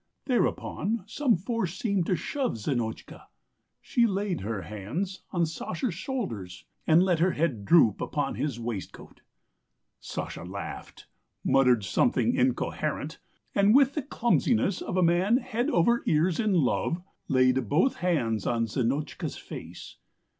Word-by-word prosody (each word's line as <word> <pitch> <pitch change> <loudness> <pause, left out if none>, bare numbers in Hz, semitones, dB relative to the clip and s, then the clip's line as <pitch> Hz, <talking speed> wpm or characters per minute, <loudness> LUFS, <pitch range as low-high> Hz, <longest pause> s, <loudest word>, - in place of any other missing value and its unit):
Thereupon 230 -4 0
some 240 +3 +1
force 195 -1 -2
seemed 200 -6 0
to 185 - +2
shove 255 - -2
Zinotchka; 115 0 -4 0.5
she 235 -1 +2
laid 195 -3 -2
her 100 -1 -3
hands 115 - -4
on 175 -3 +1
Sasha's 170 +6 -3
shoulders 115 - -5 0.2
and 165 +3 +6
let 180 -4 +2
her 180 +2 +3
head 140 -11 -1
droop 150 - +5
upon 145 -2 -1
his 140 -5 -3
waistcoat. 115 -5 -7 0.8
Sasha - - -6
laughed, 95 +3 -8 0.4
muttered 125 -5 +4
something 95 - +2
incoherent, - - -1 0.3
and 200 +3 +4
with 275 0 +5
the 300 - -1
clumsiness 240 - +1
of 185 - -3
a 185 - +4
man 180 +7 +3
head 245 +1 -2
over 235 - +3
ears 160 +3 +2
in 215 -3 +2
love, 165 +2 +1 0.3
laid 130 -3 +2
both 180 - +2
hands 120 - 0
on 115 -1 +1
Zinotchka's 130 +6 -2
face. - - -9
170 Hz, 130 wpm, -27 LUFS, -, 0.8 s, and